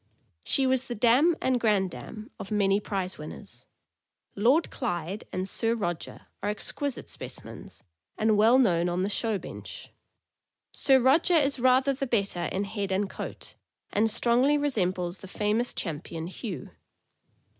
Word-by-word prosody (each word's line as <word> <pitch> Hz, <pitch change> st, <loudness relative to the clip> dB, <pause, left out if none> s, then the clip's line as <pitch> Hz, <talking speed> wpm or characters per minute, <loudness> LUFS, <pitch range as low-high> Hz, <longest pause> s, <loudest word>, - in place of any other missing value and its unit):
She 270 Hz, -, +2 dB
was 260 Hz, 0 st, +1 dB
the 240 Hz, -, -4 dB
dam 250 Hz, +10 st, +4 dB
and 255 Hz, -2 st, +1 dB
grandam 210 Hz, -, -1 dB
of -, -, -7 dB
many 200 Hz, -1 st, +2 dB
prize 190 Hz, -4 st, -4 dB
winners. 150 Hz, -, -10 dB, 0.7 s
Lord 255 Hz, +11 st, +3 dB
Clyde 185 Hz, -, -3 dB
and 185 Hz, +1 st, -2 dB
Sir 230 Hz, +3 st, 0 dB
Roger 175 Hz, -7 st, -4 dB, 0.2 s
are 205 Hz, -, -1 dB
exquisite 260 Hz, +6 st, -3 dB
specimens, -, -, -8 dB, 0.3 s
and 220 Hz, 0 st, +3 dB
well 225 Hz, +4 st, +5 dB
known 175 Hz, -9 st, +3 dB
on 180 Hz, +1 st, -1 dB
the 195 Hz, -, 0 dB
show 220 Hz, 0 st, 0 dB
bench. -, -, -9 dB, 0.8 s
Sir 270 Hz, -1 st, +4 dB
Roger 300 Hz, +8 st, +4 dB
is 280 Hz, -4 st, +2 dB
rather 260 Hz, +2 st, +4 dB
the 275 Hz, +1 st, -3 dB
better 200 Hz, -7 st, 0 dB
in 190 Hz, +4 st, -2 dB
head 200 Hz, -1 st, -4 dB
and 195 Hz, +2 st, +1 dB
coat, -, -, -7 dB, 0.4 s
and 220 Hz, +2 st, +3 dB
strongly 240 Hz, +6 st, +3 dB
resembles 185 Hz, -10 st, -1 dB
the 190 Hz, -, -10 dB
famous 215 Hz, +5 st, 0 dB
Cham 160 Hz, -5 st, -3 dB
pion 165 Hz, -1 st, -6 dB
Hugh. 185 Hz, -, -6 dB
215 Hz, 145 wpm, -27 LUFS, 190-255 Hz, 0.8 s, well